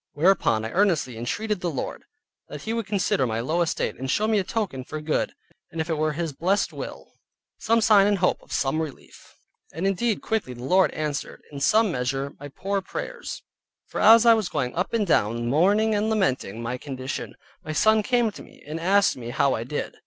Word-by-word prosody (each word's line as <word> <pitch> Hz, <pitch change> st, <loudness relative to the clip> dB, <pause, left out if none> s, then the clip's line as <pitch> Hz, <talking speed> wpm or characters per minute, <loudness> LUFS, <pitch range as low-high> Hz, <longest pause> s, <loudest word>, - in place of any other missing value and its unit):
Whereupon 145 Hz, -, +2 dB
I 110 Hz, -, -4 dB
earnestly 170 Hz, -, +1 dB
entreated 200 Hz, -, -2 dB
the 175 Hz, -, -1 dB
Lord, 140 Hz, -6 st, -5 dB, 0.4 s
that -, -, -8 dB
He 220 Hz, -, -2 dB
would 230 Hz, -3 st, -3 dB
consider 190 Hz, -10 st, +1 dB
my 110 Hz, 0 st, -2 dB
low 155 Hz, +9 st, 0 dB
estate, 170 Hz, -, -1 dB
and 130 Hz, 0 st, -4 dB
show 210 Hz, -, +1 dB
me 220 Hz, -2 st, +3 dB
a -, -, 0 dB
token 185 Hz, -, -3 dB
for 155 Hz, -, -6 dB
good, 150 Hz, 0 st, -1 dB, 0.3 s
and 165 Hz, -, -7 dB
if 160 Hz, +1 st, -2 dB
it 160 Hz, -, 0 dB
were 155 Hz, 0 st, +1 dB
His 165 Hz, -1 st, -3 dB
blessed 190 Hz, +8 st, 0 dB
will, -, -, -8 dB, 0.5 s
some 230 Hz, +1 st, +2 dB
sign 205 Hz, -2 st, +6 dB
and 205 Hz, -1 st, +2 dB
hope 180 Hz, 0 st, +1 dB
of -, -, -19 dB
some 140 Hz, +4 st, 0 dB
relief. 155 Hz, -5 st, -9 dB, 0.4 s
And 165 Hz, +5 st, -4 dB
indeed 200 Hz, +3 st, 0 dB
quickly 215 Hz, -, -2 dB
the 120 Hz, -, -9 dB
Lord 185 Hz, +8 st, +4 dB
answered, 150 Hz, -2 st, -4 dB
in 140 Hz, -, -7 dB
some 215 Hz, +7 st, +3 dB
measure, 135 Hz, +1 st, -2 dB
my 145 Hz, -, -7 dB
poor 195 Hz, +8 st, -3 dB
prayers; 485 Hz, -, -6 dB, 0.4 s
for -, -, -4 dB
as 225 Hz, +2 st, +8 dB
I 230 Hz, -, +8 dB
was 215 Hz, -5 st, 0 dB
going 125 Hz, -2 st, -2 dB
up 180 Hz, +3 st, -2 dB
and 225 Hz, -3 st, +1 dB
down 120 Hz, -, +1 dB
mourning 200 Hz, -, +3 dB
and 210 Hz, +1 st, +1 dB
lamenting 130 Hz, -, 0 dB
my 125 Hz, +2 st, -3 dB
condition, 130 Hz, -1 st, -5 dB, 0.3 s
my 155 Hz, -, -5 dB
son 220 Hz, +7 st, +4 dB
came 240 Hz, 0 st, +1 dB
to -, -, -11 dB
me, -, -, -16 dB
and 155 Hz, +3 st, -5 dB
asked 195 Hz, +4 st, +3 dB
me 120 Hz, -2 st, -7 dB
how 135 Hz, +2 st, +2 dB
I 115 Hz, -, -2 dB
did. 145 Hz, +5 st, -4 dB
170 Hz, 210 wpm, -25 LUFS, 135-210 Hz, 0.5 s, as